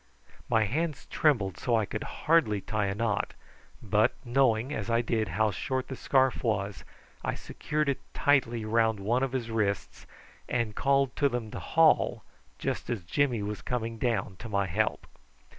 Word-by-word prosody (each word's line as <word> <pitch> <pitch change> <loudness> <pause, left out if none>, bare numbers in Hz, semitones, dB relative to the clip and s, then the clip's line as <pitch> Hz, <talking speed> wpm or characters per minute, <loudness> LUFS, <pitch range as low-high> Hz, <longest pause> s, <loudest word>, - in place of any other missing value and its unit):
My 110 -1 +4
hands 150 - -2
trembled 100 - +2
so 120 - -1
that - - +5
I 110 - +1
could 110 - -4 0.2
hardly 155 -11 +4
tie 105 +1 -1
a 95 - -2
knot, 110 -2 -1 0.5
but - - +2
knowing, 125 0 +2
as 110 -5 -4
I 115 0 +3
did, 110 -2 0
how 105 +5 +1
short 130 +7 -3
the 130 - -4
scarf 130 0 +2
was, 100 -4 -1 0.4
I - - -1
secured 150 0 -3
it 140 - 0
tightly 120 -6 +2
round 110 -1 +2
one 115 +6 +1
of 135 -1 0
his 120 -3 -2
wrists 100 -5 -2 0.4
and 120 -3 0
called 135 +2 +2
to 140 - +3
them 120 -4 -4
to - - -5
haul 160 -1 +3 0.3
just - - -3
as 115 -7 -2
Jimmy 120 +4 +1
was 105 0 -4
coming 115 -2 -3
down 105 -6 -1
to 115 - -8
my 100 -1 +1
help. 105 +5 -1
115 Hz, 175 wpm, -29 LUFS, 105-130 Hz, 0.5 s, that